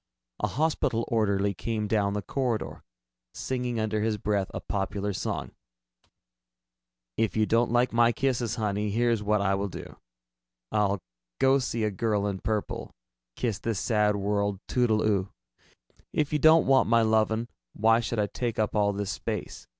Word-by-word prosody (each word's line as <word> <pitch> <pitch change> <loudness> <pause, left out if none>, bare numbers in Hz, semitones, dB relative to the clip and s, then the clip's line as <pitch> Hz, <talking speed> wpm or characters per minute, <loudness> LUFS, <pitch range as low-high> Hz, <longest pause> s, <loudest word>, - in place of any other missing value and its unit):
A - - 0
hospital 145 -6 0
orderly 100 -3 +1
came 110 +2 -3
down 100 -2 +1
the 105 -1 -3
corridor, 125 +1 -2 0.5
singing 125 -2 -2
under 110 -1 -1
his 110 0 0
breath 105 -2 -1
a - - -4
popular 100 +1 -2
song: - - -3 1.7
If 110 -2 0
you 110 - +3
don't 115 +1 +2
like 120 +1 +2
my 120 0 +5
kisses, 120 -3 -1
honey, 105 -1 -1
Here's 115 +1 +1
what 105 0 +1
I 100 -1 +2
will 100 +1 -1
do: 95 - -9 0.7
I'll 100 -4 +1 0.3
go 135 +1 +4
see 120 -3 -2
a 105 - +1
girl 105 +1 0
in 100 -2 -2
purple, 105 +1 -3 0.4
Kiss 115 -5 -2
this 115 -4 -2
sad 105 -2 +2
world 100 -1 -1
toodle 115 -4 +2
oo. 100 -3 +1 0.8
If 150 -1 -1
you 150 - +2
don't 160 +2 +6
want 135 -4 +4
my 115 0 +5
lovin', 110 +1 +2 0.3
Why 115 +2 +4
should 120 0 -3
I 105 - +2
take 115 +2 -3
up 110 0 0
all 105 -1 +2
this 100 0 -3
space? 95 - -5
110 Hz, 160 wpm, -27 LUFS, 100-120 Hz, 1.7 s, don't